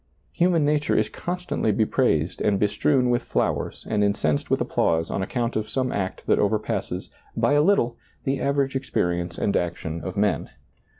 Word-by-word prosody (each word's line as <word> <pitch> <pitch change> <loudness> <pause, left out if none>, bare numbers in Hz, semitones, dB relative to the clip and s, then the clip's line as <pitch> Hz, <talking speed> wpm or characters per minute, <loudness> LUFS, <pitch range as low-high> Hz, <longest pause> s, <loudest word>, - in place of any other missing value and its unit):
Human 170 -3 +2
nature 150 0 +2
is - - +2
constantly 175 -10 -2
be 110 +2 +2
praised 85 - +1
and 100 -2 +2
bestrewn 125 +5 +2
with 120 0 +2
flowers - - -2
and 105 -1 +1
incensed 80 -8 0
with - - +2
applause 80 0 +1
on - - -1
account 120 +4 -2
of 110 0 -2
some 130 -1 -1
act 95 -2 -3
that - - +3
over - - +3
passes, - - -4 0.3
by - - +3
a 145 - +5
little, 150 -10 +2 0.3
the 135 +1 -1
average 140 -1 0
experience 85 -10 -1
and 100 - 0
action 85 -2 -2
of 95 - -5
men. 100 -6 +1
115 Hz, 175 wpm, -24 LUFS, 95-140 Hz, 0.3 s, a